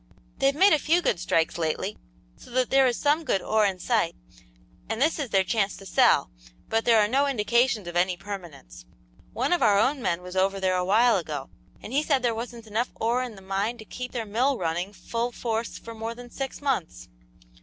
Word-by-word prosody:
They've 275 Hz, +1 st, +3 dB
made 380 Hz, +4 st, +6 dB
a 305 Hz, -, +4 dB
few 325 Hz, +5 st, +3 dB
good 175 Hz, -, +1 dB
strikes 165 Hz, -2 st, 0 dB
lately, 170 Hz, +5 st, -2 dB, 0.4 s
so -, -, -16 dB
that 255 Hz, 0 st, 0 dB
there 270 Hz, -1 st, +5 dB
is 245 Hz, -, 0 dB
some 300 Hz, +3 st, +2 dB
good 195 Hz, -, +1 dB
ore 215 Hz, +2 st, +2 dB
in 190 Hz, -2 st, -2 dB
sight, 180 Hz, -, 0 dB, 0.7 s
and 225 Hz, 0 st, -2 dB
this 310 Hz, +4 st, +2 dB
is 280 Hz, -5 st, -3 dB
their 195 Hz, -2 st, +3 dB
chance 200 Hz, 0 st, 0 dB
to 195 Hz, -, -12 dB
sell, 190 Hz, -, +3 dB, 0.4 s
but 225 Hz, 0 st, 0 dB
there 230 Hz, -2 st, +5 dB
are 210 Hz, -, +4 dB
no 275 Hz, +5 st, +2 dB
indications 235 Hz, -4 st, +1 dB
of 175 Hz, -, -6 dB
any 180 Hz, 0 st, +2 dB
permanence. 175 Hz, -, -9 dB, 0.5 s
One 265 Hz, +8 st, 0 dB
of 350 Hz, -, +1 dB
our 210 Hz, -4 st, +5 dB
own 260 Hz, +6 st, +2 dB
men 175 Hz, -4 st, -1 dB
was 180 Hz, 0 st, -8 dB
over 195 Hz, +1 st, +1 dB
there 185 Hz, -1 st, +1 dB
a 180 Hz, -, +1 dB
while 220 Hz, +5 st, +4 dB
ago, 150 Hz, -6 st, -5 dB, 0.3 s
and 235 Hz, -, -8 dB
he 285 Hz, -, +3 dB
said 280 Hz, -4 st, +1 dB
there 240 Hz, -2 st, +2 dB
wasn't 230 Hz, 0 st, -7 dB
enough 220 Hz, +3 st, -1 dB
ore 235 Hz, +3 st, 0 dB
in 245 Hz, -4 st, -5 dB
the 195 Hz, -, -14 dB
mine 195 Hz, +5 st, -2 dB
to 220 Hz, -, -11 dB
keep 250 Hz, +3 st, -7 dB
their 235 Hz, -3 st, -3 dB
mill 245 Hz, +6 st, +1 dB
running 175 Hz, +2 st, -2 dB
full 230 Hz, +5 st, -3 dB
force 230 Hz, -1 st, -3 dB
for 230 Hz, -, -9 dB
more 225 Hz, +1 st, -5 dB
than 245 Hz, 0 st, -11 dB
six 270 Hz, +1 st, -5 dB
months." 220 Hz, -, -2 dB
225 Hz, 220 wpm, -26 LUFS, 190-250 Hz, 0.7 s, made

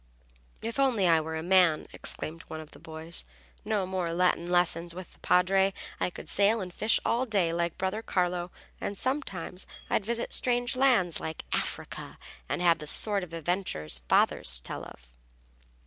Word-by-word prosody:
"If 230 Hz, +4 st, -3 dB
only 245 Hz, -9 st, +3 dB
I 165 Hz, -2 st, +5 dB
were 160 Hz, +1 st, -4 dB
a 160 Hz, -, -3 dB
man!" 180 Hz, -3 st, +4 dB
exclaimed 165 Hz, +2 st, -2 dB
one 160 Hz, -, -6 dB
of 155 Hz, -1 st, -10 dB
the -, -, -14 dB
boys. 160 Hz, +1 st, -4 dB, 0.4 s
"No 210 Hz, -3 st, 0 dB
more 185 Hz, -2 st, -2 dB
Latin 175 Hz, -1 st, +2 dB
lessons 170 Hz, -1 st, +1 dB
with 185 Hz, 0 st, -9 dB
the -, -, -23 dB
Padre. 190 Hz, +2 st, +3 dB, 0.2 s
I -, -, +1 dB
could -, -, -10 dB
sail 205 Hz, +3 st, +3 dB
and 180 Hz, -3 st, -5 dB
fish 215 Hz, +4 st, +3 dB
all 250 Hz, +3 st, +1 dB
day 190 Hz, -7 st, +1 dB
like 170 Hz, 0 st, -1 dB
brother 190 Hz, +3 st, -1 dB
Carlo. 180 Hz, -3 st, 0 dB, 0.3 s
And 200 Hz, -, -4 dB
sometimes 195 Hz, -, -3 dB, 0.2 s
I'd -, -, +2 dB
visit 235 Hz, +3 st, -1 dB
strange 245 Hz, 0 st, +2 dB
lands, 245 Hz, -10 st, +3 dB
like 160 Hz, 0 st, -5 dB
Africa, -, -, -3 dB, 0.3 s
and -, -, -1 dB
have 170 Hz, -1 st, +5 dB
the 150 Hz, -, -6 dB
sort 205 Hz, +4 st, +3 dB
of 175 Hz, -, -8 dB
adventures 165 Hz, -, -2 dB
father -, -, +4 dB, 0.2 s
tells -, -, -6 dB
of." -, -, -15 dB
180 Hz, 170 wpm, -29 LUFS, 165-205 Hz, 0.4 s, I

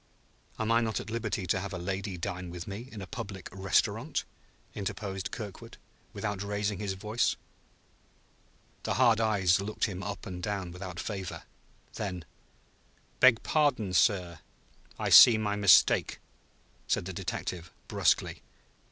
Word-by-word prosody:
"Am 110 Hz, 0 st, -1 dB
I 115 Hz, +1 st, +4 dB
not 110 Hz, -4 st, -1 dB
at 115 Hz, -, -7 dB
liberty 110 Hz, -4 st, -2 dB
to 95 Hz, +2 st, +1 dB
have 100 Hz, +1 st, -5 dB
a -, -, -3 dB
lady 95 Hz, +1 st, -4 dB
dine 90 Hz, 0 st, -4 dB
with 85 Hz, -1 st, -7 dB
me 105 Hz, +6 st, -7 dB
in 105 Hz, -3 st, -7 dB
a -, -, -6 dB
public 95 Hz, 0 st, -7 dB
restaurant?" 95 Hz, -3 st, 0 dB, 0.5 s
interposed 95 Hz, -1 st, -4 dB
Kirkwood, 105 Hz, -5 st, -8 dB, 0.3 s
without 105 Hz, -3 st, -4 dB
raising 100 Hz, -1 st, -2 dB
his 100 Hz, -2 st, -2 dB
voice. 105 Hz, +5 st, 0 dB, 1.5 s
The -, -, -2 dB
hard 115 Hz, -1 st, +4 dB
eyes 100 Hz, -4 st, +3 dB
looked 105 Hz, +2 st, -5 dB
him 95 Hz, -4 st, -5 dB
up 100 Hz, +1 st, -6 dB
and 90 Hz, -1 st, -6 dB
down 95 Hz, -2 st, -3 dB
without 90 Hz, 0 st, -7 dB
favor. 95 Hz, -3 st, -5 dB, 0.5 s
Then: 90 Hz, -5 st, -5 dB, 0.9 s
"Beg 125 Hz, -3 st, +6 dB
pardon, 125 Hz, -11 st, +1 dB
sir. 90 Hz, -4 st, +2 dB, 0.6 s
I -, -, -1 dB
see 115 Hz, -3 st, +10 dB
my 105 Hz, -1 st, -1 dB
mistake," 100 Hz, -2 st, +5 dB, 0.7 s
said -, -, 0 dB
the 95 Hz, -, -5 dB
detective 85 Hz, 0 st, -5 dB, 0.2 s
brusquely. -, -, +1 dB
100 Hz, 140 wpm, -29 LUFS, 90-105 Hz, 1.5 s, see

